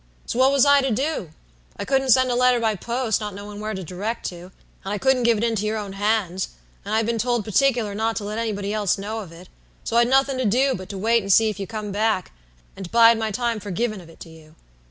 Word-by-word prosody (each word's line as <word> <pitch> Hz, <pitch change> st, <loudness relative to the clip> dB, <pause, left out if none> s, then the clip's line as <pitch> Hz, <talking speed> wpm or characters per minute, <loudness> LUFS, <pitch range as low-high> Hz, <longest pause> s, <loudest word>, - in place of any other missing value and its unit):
So 240 Hz, -, -3 dB
what 260 Hz, +1 st, +5 dB
was 275 Hz, -1 st, +4 dB
I 285 Hz, 0 st, +5 dB
to 270 Hz, -, -1 dB
do? 260 Hz, -, -2 dB, 0.5 s
I -, -, -4 dB
couldn't 270 Hz, -1 st, +1 dB
send 255 Hz, +1 st, +4 dB
a -, -, 0 dB
letter 250 Hz, 0 st, +3 dB
by 225 Hz, -2 st, +1 dB
post, 235 Hz, +2 st, -2 dB
not 210 Hz, -2 st, -5 dB
knowin' 205 Hz, +1 st, -8 dB
where 215 Hz, 0 st, -4 dB
to 190 Hz, -, -5 dB
direct 195 Hz, +7 st, -5 dB
to, 175 Hz, -1 st, -10 dB, 0.4 s
and 195 Hz, -, -5 dB
I -, -, -2 dB
couldn't 265 Hz, +3 st, +2 dB
give 235 Hz, -2 st, +3 dB
it 215 Hz, -, -2 dB
into 225 Hz, -3 st, 0 dB
your 220 Hz, +1 st, -1 dB
own 205 Hz, -2 st, -6 dB
hands, 195 Hz, -3 st, 0 dB, 0.4 s
and 205 Hz, +2 st, -2 dB
I'd 225 Hz, 0 st, +2 dB
been 230 Hz, 0 st, -1 dB
told 240 Hz, -1 st, 0 dB
partickler 225 Hz, 0 st, +1 dB
not 220 Hz, +2 st, -1 dB
to 210 Hz, -, -3 dB
let 210 Hz, +2 st, -4 dB
anybody 205 Hz, -3 st, -3 dB
else 210 Hz, -2 st, 0 dB
know 210 Hz, +3 st, -4 dB
of 190 Hz, -6 st, -9 dB
it; 170 Hz, +2 st, -13 dB, 0.4 s
so 230 Hz, -, -1 dB
I'd 235 Hz, 0 st, +5 dB
nothing 270 Hz, +1 st, +2 dB
to 260 Hz, -, 0 dB
do 260 Hz, +6 st, +2 dB
but 185 Hz, -1 st, -7 dB
to 200 Hz, -, -6 dB
wait 230 Hz, +4 st, +2 dB
and 195 Hz, -1 st, -2 dB
see 220 Hz, +2 st, +5 dB
if 205 Hz, -, -10 dB
you 195 Hz, -, -4 dB
come 215 Hz, -2 st, -5 dB
back, 210 Hz, -2 st, 0 dB, 0.4 s
and 190 Hz, -3 st, -8 dB
bide 230 Hz, -1 st, +6 dB
my 220 Hz, -1 st, -1 dB
time 235 Hz, +1 st, -2 dB
for 205 Hz, 0 st, -8 dB
givin' 215 Hz, +2 st, -2 dB
of 165 Hz, -, -15 dB
it 165 Hz, -, -17 dB
to 165 Hz, -, -10 dB
you. 160 Hz, -1 st, -16 dB
220 Hz, 260 wpm, -23 LUFS, 200-240 Hz, 0.5 s, bide